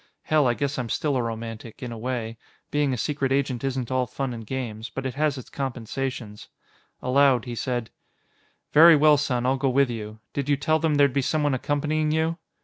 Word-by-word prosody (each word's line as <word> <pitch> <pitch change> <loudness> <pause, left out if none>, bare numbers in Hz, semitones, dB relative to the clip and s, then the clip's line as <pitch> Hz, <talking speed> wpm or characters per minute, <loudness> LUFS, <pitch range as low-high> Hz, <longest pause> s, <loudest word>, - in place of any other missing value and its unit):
_ - - -21
_Hell, 150 -4 +5
I 120 - +1
guess 140 0 -2
I'm 120 -2 -3
still 145 +3 0
a 125 - +1
romantic, 115 0 -6
in 125 - -5
a 115 - -6
way. 115 -2 -4 0.3
Being 145 -2 +1
a 125 - -1
secret 140 +1 -1
agent 135 -2 0
isn't 130 -2 -2
all 130 -1 +1
fun 130 0 -3
and 115 -2 -8
games, 115 -4 -4
but 135 +3 -6
it 130 - -2
has 150 -1 0
its 130 - -10
compensations._ 125 -4 -4 0.6
Aloud, 130 -1 +4
he 120 - -5
said, 120 -1 -3 0.8
"Very 165 +2 +9
well, 150 0 +6
son; 125 -4 -1
I'll 130 +1 +2
go 135 0 +1
with 135 0 +3
you. 110 -1 -6
Did 140 0 -3
you 145 - +3
tell 155 +3 +1
them 155 -1 +1
there'd 140 -2 +4
be 140 - +2
someone 145 +1 +1
accompanying 150 +3 0
you?" 160 +2 0
130 Hz, 210 wpm, -25 LUFS, 120-145 Hz, 0.8 s, Very